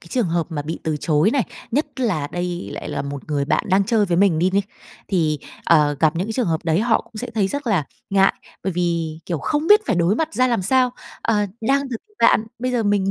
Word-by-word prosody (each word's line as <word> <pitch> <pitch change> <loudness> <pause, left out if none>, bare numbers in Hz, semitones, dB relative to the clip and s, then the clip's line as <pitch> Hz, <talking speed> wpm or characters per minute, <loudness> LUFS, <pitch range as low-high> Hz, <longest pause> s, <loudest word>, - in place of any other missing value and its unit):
cái 170 - -16
trường 240 -9 +1
hợp 170 -1 0
mà 150 -3 -3
bị 160 +3 -5
từ 155 -2 0
chối 155 +6 +2
này, 270 -2 +2 0.3
nhất 295 +6 +1
là 175 - 0
đây 175 0 -3
lại - - -6
là - - -3
một 140 -1 -6
người 145 -2 0
bạn 150 - +1
đang 190 +1 +3
chơi 215 0 +2
với 170 -1 0
mình 190 -4 +4
đi 180 +3 +2
ni, 200 +1 +2 0.5
thì, 160 -6 +1 0.3
ờ, 150 -3 +4
gặp 155 0 +3
những 185 +4 -1
cái 225 - -3
trường 245 -3 0
hợp 160 +1 -1
đấy 165 +3 +2
họ 225 -1 +2
cũng - - -22
sẽ - - -5
thấy 200 -3 +2
rất 285 +2 -4
là 185 -10 +2 0.3
ngại. 195 0 +4 0.3
Bởi 190 - 0
vì, 170 -2 -1
kiểu, 170 -3 -2
không 300 - -1
biết 420 0 +7
phải 220 -7 +1
đối 175 +4 +3
mặt 320 +4 0
ra 255 0 +3
làm 235 -6 0
sao, 255 +5 +3 0.3
ờ, 210 -2 +1
đang 275 +5 +2
từ 230 - -2 0.2
bạn, 230 -1 +4
bây 255 +1 -2
giờ 235 -2 +1
mình 200 -2 +1
190 Hz, 250 wpm, -21 LUFS, 165-230 Hz, 0.5 s, biết